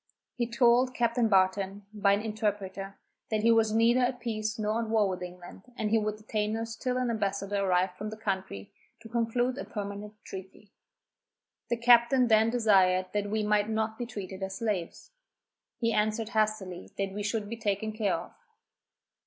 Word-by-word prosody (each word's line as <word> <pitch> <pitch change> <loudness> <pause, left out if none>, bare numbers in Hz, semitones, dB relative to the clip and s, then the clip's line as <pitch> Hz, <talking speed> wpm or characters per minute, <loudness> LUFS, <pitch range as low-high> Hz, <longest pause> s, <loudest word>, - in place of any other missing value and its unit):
He 240 -1 -2
told 245 +1 +3
Captain 235 -1 +2
Barton, 195 +1 +2
by 200 -1 +3
an 205 +1 0
interpreter, 200 -3 -3 0.3
that 215 -1 0
he 230 - +5
was 225 -1 +4
neither 230 +3 +4
at 250 0 +1
peace 215 -2 -3
nor 215 +2 0
war 220 -2 +2
with 185 -1 -4
England, 180 +5 -10
and 210 -1 -1
he 225 - +4
would 215 0 -2
detain 215 0 -2
us 225 0 -4
till 250 +2 -2
an 250 -2 0
ambassador 200 -2 -1
arrived 185 -1 +1
from 210 +1 -4
that 215 0 -9
country 190 - -4 0.3
to - - -10
conclude 240 +3 0
a - - -3
permanent 205 0 -6
treaty. 190 +2 -10 1.0
The 235 - +1
captain 240 +1 +5
then 220 0 +5
desired 190 -6 +3
that 205 -1 -1
we 215 +1 0
might 210 0 +2
not 220 +1 -1
be 240 - -3
treated 195 -4 -7
as 190 0 -3
slaves. 210 - -3 0.7
He 230 -1 0
answered 215 +1 0
hastily, 215 - -1
that 195 -1 -2
we 205 - -4
should 210 0 -2
be 230 +2 -5
taken 215 0 -1
care 215 -2 0
of. - - -7
215 Hz, 175 wpm, -29 LUFS, 200-230 Hz, 1.0 s, he